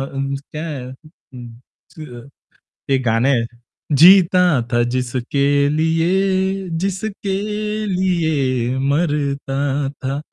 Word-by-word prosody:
हं, 135 0 -2 0.2
क्या 155 +2 -5
है 140 -5 -5
अं, 130 -3 -14 0.5
अ, 130 -5 -10 0.7
एक 130 - +2
गाणं 115 +3 +2
आहे, 125 -4 +2 0.6
जीता 180 0 +7 0.3
था 120 0 +2
जिसके 125 +2 -2 0.4
लिये, 190 +4 0 0.2
जिसके 195 +1 -3 0.6
लिये 145 -9 0
मरता 140 -2 -1 0.5
था. 135 +2 -2
145 Hz, 95 wpm, -19 LUFS, 130-180 Hz, 0.7 s, जीता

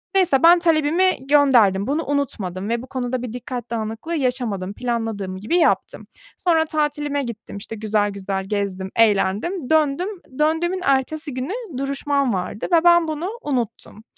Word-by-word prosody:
Neyse, 350 -8 +3
ben 345 +1 +8
talebimi 325 -2 +2
gönderdim, 245 -9 +4
bunu 305 +4 -1
unutmadım 210 -9 -2
ve 235 0 -1
bu 260 - -10
konuda 255 -1 -3
bir 245 -2 -6
dikkat 245 -1 -6
dağınıklığı 225 +8 -4
yaşamadım, 240 -8 -2
planladığım 225 -6 -3
gibi 215 - 0
yaptım. 350 - +1 0.3
Sonra 325 -3 +2
tatilime 295 -2 -1
gittim 225 -4 -7
işte 220 +2 -7
güzel 210 -1 0
güzel 195 -1 -4
gezdim, 195 -2 -3
eğlendim, 225 - +1
döndüm. 315 +4 +2 0.3
Döndüğümün 340 +4 +1
ertesi 275 +2 0
günü 335 - -5
duruşmam 275 -2 0
vardı 185 +3 -3
ve 330 0 +5
ben 345 -1 +6
bunu 315 +4 -3
unuttum. 240 -5 -4
260 Hz, 145 wpm, -21 LUFS, 215-310 Hz, 0.3 s, ben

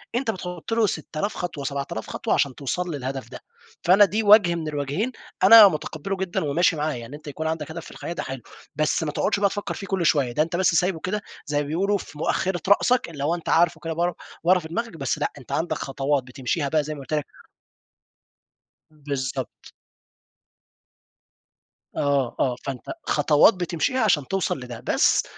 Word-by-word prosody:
أنت 240 -2 0
بتحُط 180 +2 -6
له 225 -2 +3
سِت 155 -2 -5
آلاف 205 +5 -1
خطوة، 160 -5 -4
سبعة 140 0 -3
آلاف 110 - -5
خطوة - - -1
عشان 140 -3 +1
توصَل 175 +6 -3
للهدَف 135 0 -5
ده، - - -9 0.4
فأنا 195 +4 +7
دي 215 +4 -1
وجْه 205 -4 +6
من 160 -2 -4
الوجهين 150 - -2 0.3
أنا 210 +1 +10
متقبّله 165 +3 -3
جدًا 190 -3 -2
وماشي 160 +4 +2
معاه، 155 0 -1
يعني 120 +3 -8
أنت 150 0 -13
يكون 160 +3 -4
عَندك 160 -1 -3
هدَف - - -7
في - - -11
الحياة 170 - -6
ده - - -4
حلو، 130 -2 -6 0.3
بس 155 +2 +1
ما 150 - -2
تقعُدش 200 - 0
بقى 200 -1 +3
تفكّر 205 +1 -4
فيه 195 - -7
كلّ 185 -3 -1
شوية، 140 -6 +3
ده 150 - +2
أنت 165 +2 -4
بس 180 -2 +2
سايبه 180 0 +1
كده 205 +5 -3 0.2
زي 150 0 -2
ما 145 - -5
بيقولوا 195 +6 +1
في 155 - -11
مؤخّرة 175 +3 -1
رأسك، 245 0 +3
اللي 145 -4 -6
هو 165 +4 +1
أنت 170 - -6
عارفه 170 0 +3
كده 165 0 -2
بر 175 +2 0 0.3
ورا 180 +2 +5
في 160 - -8
دماغك، 230 +2 -4
بس 135 -4 -1
لأ، - - -1
أنت 130 - -12
عَندك 170 +2 -1
خطوات 135 0 -1
بتمشِيها 130 +3 -2
بقى 155 0 +2
زي 155 +1 -5
ما - - -9
قُلت 135 +3 -7
لك. 150 -2 0 1.6
بالضبط. 140 -4 -5 2.2
آه، 140 -4 +1
آه، 125 -2 +1
فأنت 135 -3 -4 0.3
خطوات 150 +7 +5
بتمشيها 180 - -1
عشان 155 -10 +2
توصَل 195 -6 -1
لده، 120 -2 -8
بس - - +2
160 Hz, 190 wpm, -24 LUFS, 140-185 Hz, 2.2 s, أنا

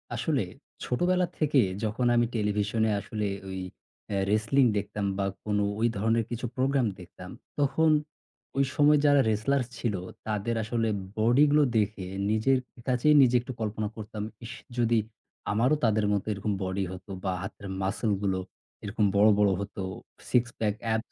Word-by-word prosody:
আসলে - - 0 0.4
ছোটবেলা 180 +8 +2
থেকে 145 -4 +4 0.2
যখন 110 +3 -1
আমি 120 - +4
টেলিভিশনে 105 +1 +1
আসলে 105 +1 -3 0.2
ওই 95 0 -4 0.5
আ - - 0
wrestling 110 +5 +3
দেখতাম 100 0 -3
বা 100 - 0 0.2
কোনো 105 -1 +1 0.2
ওই 115 - +3
ধরনের 115 +2 +1
কিছু 120 +1 -4
program 135 -1 +2
দেখতাম 90 0 -11 0.3
তখন 145 +3 +3 0.7
ওই 140 - +4
সময় 150 0 +5
যারা 145 -1 +6
wrestlers 115 +4 +1
ছিল 110 -4 -1 0.3
তাদের 110 +2 -1
আসলে 115 +1 -1 0.3
body 120 +6 +5
গুলো 150 0 +5
দেখে 105 -2 0 0.2
নিজের 110 +5 +3 0.3
কাছেই 130 +4 +4
নিজে 125 -2 +4
একটু 125 - -7
কল্পনা 110 0 -2
করতাম, 105 -1 -6 0.2
"ইশ! 115 - -7 0.2
যদি 120 -1 +3 0.5
আমারও 120 +8 +3
তাদের 110 -2 +3
মতো 100 - -1
এরকম 100 +1 -3
body 95 +1 -1
হতো 95 +2 -10
বা 95 -2 0
হাতের 100 +1 -7
muscle 105 +3 0
গুলো 95 -2 0 0.4
এরকম 105 +1 0
বড়, 105 +2 +6
বড় 105 -1 +4
হতো, 100 -1 -5 0.5
6 125 - +4 0.2
pack 105 -2 0 0.2
abs 110 0 -3
110 Hz, 155 wpm, -28 LUFS, 105-125 Hz, 0.7 s, যারা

